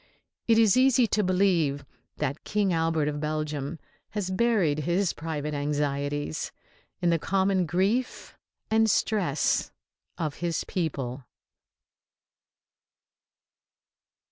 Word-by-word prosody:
It 225 -1 +5
is 220 -4 +5
easy 255 -1 +5
to 210 -1 +1
believe 180 -7 +2 0.3
that 140 +3 -3
King 205 -3 0
Albert 160 -2 +1
of 150 0 -2
Belgium 150 0 -3 0.3
has 205 -3 -3
buried 185 -8 +2
his 175 +5 +1
private 150 -1 -4
anxieties 145 - -2 0.5
in 175 - +4
the 165 - +2
common 190 0 +1
grief 200 +9 -1 0.4
and 220 0 +4
stress 195 -8 +1 0.5
of 155 -4 -3
his 170 -2 -1
people. 140 -8 -3
165 Hz, 100 wpm, -27 LUFS, 150-200 Hz, 0.5 s, It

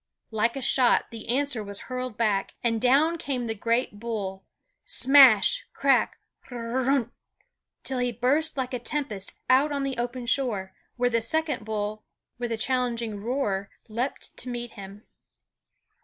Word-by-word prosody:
Like 225 +2 +1
a 270 - -4
shot 250 -1 +3
the 225 0 -9
answer 260 -3 +1
was 200 0 -7
hurled 255 -3 -5
back, 210 -4 0
and 230 -2 +1
down 295 +7 +3
came 260 -5 -2
the 225 - -2
great 230 0 -1
bull 200 -4 -4 0.4
smash, 270 - +6
crack, - - +2 0.3
r 245 - -6 0.2
r - - 0
runh! 255 -3 +1 0.7
till 265 -1 -2
he 245 0 +1
burst 280 +7 0
like 260 0 -2
a 250 - -1
tempest 235 -7 -3
out 270 +4 +4
on 280 -1 -1
the 270 -3 -2
open 240 +1 -3
shore, 235 -8 0 0.2
where 245 0 +2
the 230 -1 +2
second 305 -2 0
bull 215 0 -3 0.4
with 240 -1 -3
a 225 - -1
challenging 235 -3 -1
roar 205 -4 -1 0.2
leaped 240 +5 -4
to 250 - -6
meet 240 -1 -4
him. 200 0 -10
240 Hz, 155 wpm, -26 LUFS, 220-265 Hz, 0.7 s, smash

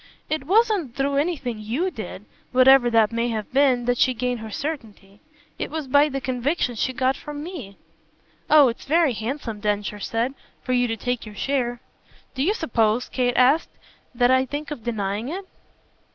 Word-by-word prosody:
"It 310 -3 -1
wasn't 395 - +2
through 275 0 0
anything 280 -7 -1
YOU 255 - -2
did - - -8 0.3
whatever 255 -1 +6
that 225 -2 +3
may 230 +1 0
have 220 -2 -4
been 260 -3 +3
that 245 0 +1
she 255 - +3
gained 250 0 -2
her 220 0 -7
certainty. 215 -7 -6 0.4
It - - -3
was 310 0 -4
by 285 +3 +4
the 275 -1 -3
conviction 255 +2 -1
she 235 +3 -1
got 260 +1 +1
from 295 0 -7
me." 275 - -8 0.7
"Oh 300 -2 +7
it's 235 - -4
very 320 -2 +3
handsome," 225 -1 -4
Densher 210 0 -2
said, 230 +5 -1 0.3
"for 255 - -1
you 245 0 +2
to 225 -1 -3
take 245 -1 -3
your 210 - -10
share!" 245 0 -1 0.5
"Do 265 - -3
you 390 +9 +2
suppose," 230 - +1
Kate 245 -2 0
asked, 265 +6 +4 0.5
"that 245 +1 +3
I 260 0 +3
think 290 +2 -5
of 250 -7 -6
denying 215 0 -2
it?" 380 +4 -5
255 Hz, 180 wpm, -23 LUFS, 230-285 Hz, 0.7 s, Oh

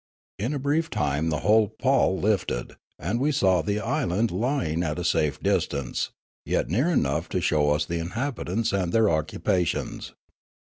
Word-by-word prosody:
In 120 +9 -1
a - - -1
brief 150 +4 0
time 75 - 0
the 75 -2 -1
whole 110 0 +4
pall 125 -3 +1
lifted, 100 - -1 0.2
and 100 - -2
we 145 +4 +2
saw 95 - +3
the 100 +6 -1
island 100 +2 0
lying 90 - 0
at 75 -2 -2
a 90 - -3
safe 75 -4 +1
distance, 70 -3 -1 0.4
j - - 0
et - - 0
near 120 - +2
enough 80 - 0
to 90 - -1
show 75 -4 +2
us 75 +1 +1
the 85 +2 -3
inhabitants 115 +2 -2
and 95 -3 0
their 110 -2 +4
occupations. 80 +2 -1
95 Hz, 170 wpm, -25 LUFS, 80-115 Hz, 0.4 s, whole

